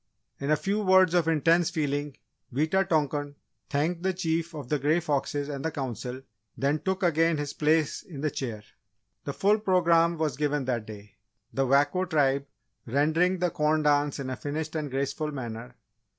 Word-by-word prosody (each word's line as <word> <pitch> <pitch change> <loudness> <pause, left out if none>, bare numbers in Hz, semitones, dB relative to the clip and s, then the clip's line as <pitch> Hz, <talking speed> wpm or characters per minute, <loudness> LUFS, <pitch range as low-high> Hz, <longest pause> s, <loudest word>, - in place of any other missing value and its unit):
In 140 - -3
a 155 - +5
few 195 +8 -1
words 185 -3 +5
of 175 -2 +3
intense 165 +2 +3
feeling, 145 -4 -2 0.3
Wita 155 +9 +2
tonkan 145 -2 0 0.3
thanked 160 +4 0
the 190 0 0
Chief 165 -1 -1
of 145 -5 -7
the 150 +3 0
Grey 150 +5 +2
Foxes 145 -2 -1
and 140 -2 -5
the 160 - 0
Council, 130 -3 -5 0.3
then 140 +3 +1
took 190 +5 -2
again 165 -1 +3
his 145 -1 -3
place 155 0 +1
in 145 -6 -9
the 155 -1 0
Chair. 115 -6 -5 0.6
The 140 - -3
full 205 +7 +3
programme 170 -4 +3
was 155 -4 -1
given 150 -2 0
that 120 -4 -2
day. 105 -1 -11 0.4
The 135 0 +1
Wako 145 +7 +3
Tribe 140 -5 +1 0.4
rendering 160 +8 +2
the 180 -1 0
Corn 155 +1 +1
Dance 145 -1 +2
in 135 -2 -4
a - - -2
finished 155 +4 -4
and 150 -2 -2
graceful 140 +3 -2
manner. 120 -2 -6
150 Hz, 175 wpm, -27 LUFS, 140-165 Hz, 0.6 s, a